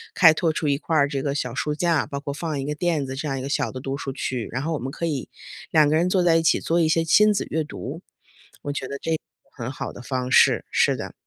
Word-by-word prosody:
开 165 -5 +7
拓 160 0 +1
出 155 - -2
一 140 -1 +2
块 165 - -2
儿 140 -1 +4
这 140 -1 -3
个 140 - -1
小 125 -4 -2
书 150 +2 -1
架， 165 -1 +1
包 140 - -4
括 140 0 -5
放 150 -1 -3
一 135 - -3
个 150 - -2
垫 160 -3 0
子 130 - -5
这 145 +3 -4
样 135 -2 -2
一 - - -5
个 - - -4
小 - - 0
的 130 - -6
读 135 +1 -4
书 140 -1 -4
区， 130 -3 -3
然 125 +3 -2
后 165 +2 -1
我 150 - -2
们 130 +2 -4
可 170 +3 -4
以 145 -5 -3 0.4
两 155 -2 +5
个 155 - +2
人 170 +3 +2
坐 180 -1 +2
在 170 -2 +4
一 165 - +3
起 - - +3
做 170 +1 0
一 160 - +3
些 165 +1 +2
亲 210 +6 +5
子 200 - -1
阅 160 0 0
读， 100 -11 -7 0.6
我 145 - -3
觉 135 -2 -4
得 140 - -4
这 165 - -3
是 - - +3
个 - - -16 0.3
很 120 -2 -5
好 - - -5
的 - - -11
方 125 +1 -3
式， - - +5
是 - - +3
的。 - - -6
145 Hz, 320 characters per minute, -24 LUFS, 135-165 Hz, 0.6 s, 开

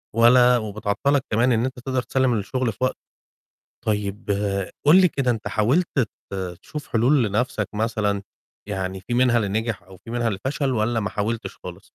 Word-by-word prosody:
ولا 125 +2 +6
وبتعطَّلك 110 +5 0
كمان 120 +4 +3
إن 115 0 +2
أنت 130 -1 -5
تقدَر 130 +1 -1
تسلِّم 130 -1 +1
الشغل 115 +3 -1
في - - -16
وقته. 130 - 0 0.9
طيب 105 -1 -2 0.6
قُل 165 +6 +8
لي 185 - +5
كده 135 -5 0
أنت 115 -3 -2
حاولت 130 +12 +2 0.4
ت - - -5 0.3
تشوف 150 -2 -7
حلول 125 +3 +3
لنَفْسك 105 0 -1
مثلًا، 105 -2 0 0.5
يعني 95 -2 -3
فيه 100 +5 -4
منها 125 -1 +4
اللي 110 -4 +1
نجح 110 0 -2
أو 95 +2 -15
فيه - - -9
منها 120 -1 0
اللي 100 -4 -2
فشل 140 0 0
والّا 115 0 +1
ما 105 - -2
حاولتش 110 +2 -3
خالص؟ - - -10
115 Hz, 175 wpm, -23 LUFS, 105-130 Hz, 0.9 s, قُل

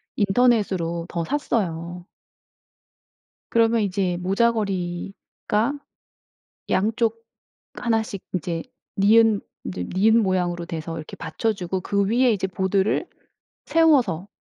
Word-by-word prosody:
인터넷으로 195 -6 +2
더 170 - -2
샀어요. 175 - -2 1.4
그러면 230 0 +3
이제 190 -3 0
모자걸이가 195 +3 -1 1.0
양쪽 225 +3 0 0.5
1 225 -2 0
씩 200 -3 -7
이제 170 -2 -2 0.3
니은 215 +1 +5 0.2
이제 90 -1 -4
니은 220 +4 +5
모양으로 175 -3 0
돼서 165 0 -5
이렇게 155 - -8
받쳐주고 190 -5 -2
그 200 +2 0
위에 245 +3 +3
이제 190 -2 -1
보드를 190 - 0 0.6
세워서 260 - +3
195 Hz, 225 characters per minute, -23 LUFS, 175-225 Hz, 1.4 s, 니은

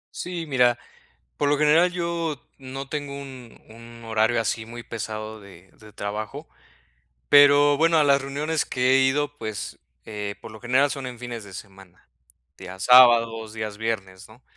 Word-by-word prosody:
Sí, 175 -2 -5
mira, 125 -5 +2 0.6
por 145 - 0
lo 145 - +2
general 155 +4 +4
yo 170 -4 -3 0.2
no 135 0 -8
tengo 145 0 -5
un 130 -4 -12
un 115 +1 -14
horario 110 +1 +1
así, 110 0 -2
muy 120 +1 -9
pesado 110 -1 -7
de 95 -2 -16
de 110 -1 -17
trabajo, 105 +1 -6 0.8
pero 145 0 +6
bueno, 165 +2 +3
a 150 - +4
las 140 -1 +3
reuniones 150 +3 -2
que 125 +1 +1
he 135 - +5
ido, 145 +2 0
pues, 110 -6 -6 0.2
eh, 105 -1 -6
por 110 - -11
lo 110 - -12
general, 130 +4 +2
son 135 -2 -5
en 125 -1 -10
fines 120 -1 -7
de 100 -2 -13
semana, 95 -2 -14 0.5
días 95 +1 -8
sábados, 115 -3 +5
días 110 -2 -5
viernes 100 -4 -4
¿no? 115 +4 -19
120 Hz, 165 wpm, -24 LUFS, 110-145 Hz, 0.8 s, pero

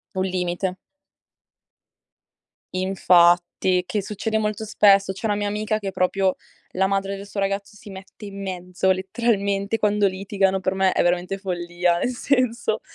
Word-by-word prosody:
un 185 - 0
limite. 180 0 -2 2.0
Infatti, 180 -1 +3
che 210 -2 -2
succede 220 +2 -2
molto 215 0 -2
spesso. 195 -2 +4
C'è 210 +4 -5
una 205 - +1
mia 205 0 -2
amica 215 +1 -1
che 195 -2 -4
proprio 190 +1 +1 0.4
la 190 +1 +2
madre 195 0 -1
del 200 +1 -9
suo 200 0 -4
ragazzo 195 +1 -2
si 205 - -12
mette 195 +2 -11
in 200 0 -8
mezzo 180 0 -2
letteralmente 200 +1 -1
quando 210 -1 +2
litigano. 195 0 0
Per 185 +1 -1
me 190 -1 +2
è - - +2
veramente 180 +2 0
follia, 175 -2 -1
nel 250 - -1
senso 240 -4 0
195 Hz, 150 wpm, -23 LUFS, 185-205 Hz, 2.0 s, spesso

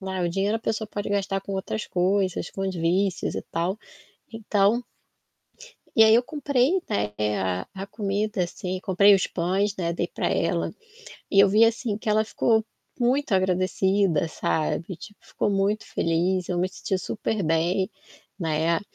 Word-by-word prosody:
né, 190 -1 -4
o 175 - +1
dinheiro 195 +5 0
a - - -8
pessoa 220 -1 -2
pode 205 -1 -4
gastar 195 -1 -1
com 195 - -7
outras 195 +3 -3
coisas, 185 +1 0
com 195 - -5
as 190 -1 -2
vícios 180 +3 0
e - - -3
tal, 175 +5 -2 0.5
então 220 +1 +1 1.1
e 225 - +8
aí 220 - +6
eu 235 - +5
comprei, 285 +4 +1
né, 105 +1 -1 0.3
a 95 -1 -2
a 195 +1 -6
comida 205 -1 -2
assim, 185 +1 -5
comprei 200 +2 +5
os 190 - +1
pães, 190 +4 -1
né, 170 -2 -1
dei - - -1
pra - - -2
ela, - - 0 0.6
e 195 - +6
eu 200 - +6
vi 215 +3 +5
assim 225 -2 0
que 215 - -6
ela 215 +1 +3
ficou 220 0 +1 0.3
muito 250 0 +1
agradecida, 185 -2 +2
sabe, 160 +3 -2
tipo 210 0 -12
ficou - - -1
muito 200 +2 0
feliz, 175 +2 0
eu 180 - -1
me 185 +1 +1
senti 190 0 -3
super 215 +2 -3
bem, 170 +4 +1 0.5
né. 165 0 +1
195 Hz, 165 wpm, -25 LUFS, 180-215 Hz, 1.1 s, e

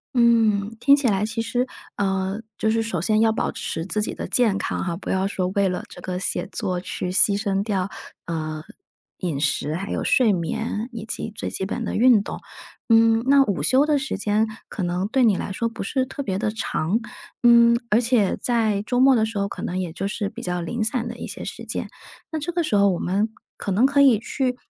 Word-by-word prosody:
嗯， 225 -3 +3
听 280 +4 +6
起 280 -3 0
来 200 -1 +1
其 220 +1 -3
实 245 +3 -1 0.3
呃， 190 0 -1 0.2
就 220 - +1
是 225 +1 +1
首 190 -7 -3
先 215 +4 +2
要 225 0 +4
保 - - -1
持 160 - -4
自 210 - -2
己 210 - -2
的 - - -5
健 225 -6 +2
康 - - -2
哈， 175 -2 -2
不 180 - -8
要 190 +1 +1
说 185 -2 -2
为 200 -1 +3
了 180 -1 -3
这 180 - -11
个 180 0 -4
写 185 - -2
作 185 -5 -2
去 180 0 -4
牺 200 +2 +5
牲 200 -2 0
掉， 195 -3 -1 0.4
呃， 155 -2 -4 0.6
饮 165 -7 -3
食 150 0 0
还 190 +5 -4
有 - - -2
睡 255 -6 +4
眠 210 +5 -2
以 225 -3 -7
及 220 0 -5
最 - - -4
基 190 - -3
本 235 +4 -3
的 - - -3
运 240 -2 +5
动。 - - -6 0.5
嗯， 225 0 +5
那 275 0 +6
午 200 -6 -2
休 275 +3 +4
的 300 - +3
时 295 +2 -3
间 215 +1 +1 0.2
可 195 - -4
能 180 +2 -1
对 255 +3 +2
你 215 -4 +4
来 195 - -4
说 230 +4 -1
不 230 0 -7
是 260 +6 0
特 270 - -6
别 195 -8 -2
地 215 0 -1
长， 210 -2 -1 0.4
嗯， 235 -1 +6
而 210 - +4
且 235 -5 +2
在 220 -4 +1
周 245 +3 -1
末 265 0 +6
的 220 - +3
时 220 -2 -4
候 200 - 0
可 - - -7
能 185 - -2
也 180 -3 -3
就 195 +3 -3
是 205 0 -3
比 235 +3 -9
较 180 -1 -2
零 220 +7 -2
散 230 +1 -1
的 235 0 -7
一 - - -6
些 - - -7
时 - - -7
间， - - -4 0.4
那 315 - -2
这 305 +4 -3
个 345 0 0
时 300 - 0
候 200 0 +5
我 175 - -2
们 200 +5 0 0.3
可 200 - -4
能 225 +8 +4
可 280 0 +1
以 260 -6 +6
去 250 +3 -2
215 Hz, 250 characters per minute, -23 LUFS, 190-235 Hz, 0.6 s, 听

